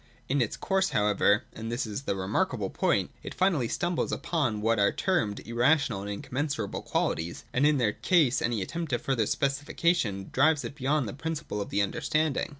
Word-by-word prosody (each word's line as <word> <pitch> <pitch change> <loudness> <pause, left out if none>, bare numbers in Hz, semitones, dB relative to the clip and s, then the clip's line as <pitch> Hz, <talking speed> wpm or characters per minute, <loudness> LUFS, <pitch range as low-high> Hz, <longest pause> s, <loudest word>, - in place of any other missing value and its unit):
In 140 +1 +1
its 115 - -1
course, 190 0 +1
however 105 +1 +3
(and 115 +1 -6
this 120 +2 -1
is 105 +2 -4
the - - 0
remarkable 95 0 -1
point), - - +1
it - - -8
finally 175 -10 +2
stumbles 175 +7 -1
upon 130 -11 -1
what 110 +1 +1
are 100 - +4
termed 115 - 0
irrational 120 -1 +2
and 100 - -6
incommensurable 125 +1 -3
quantities; 85 +1 -2
and 140 +4 +4
in 150 -1 +3
their 110 -5 +1
case 155 -9 +3
any 115 -4 0
attempt 165 - -4
at 120 - +1
further 120 -6 0
specification 140 - 0
drives 150 +2 +3
it - - -5
beyond 140 -1 0
the 100 - -5
principle 150 -7 -4
of - - -5
the 100 +1 +1
understanding. 155 +8 0
125 Hz, 180 wpm, -28 LUFS, 105-150 Hz, -, are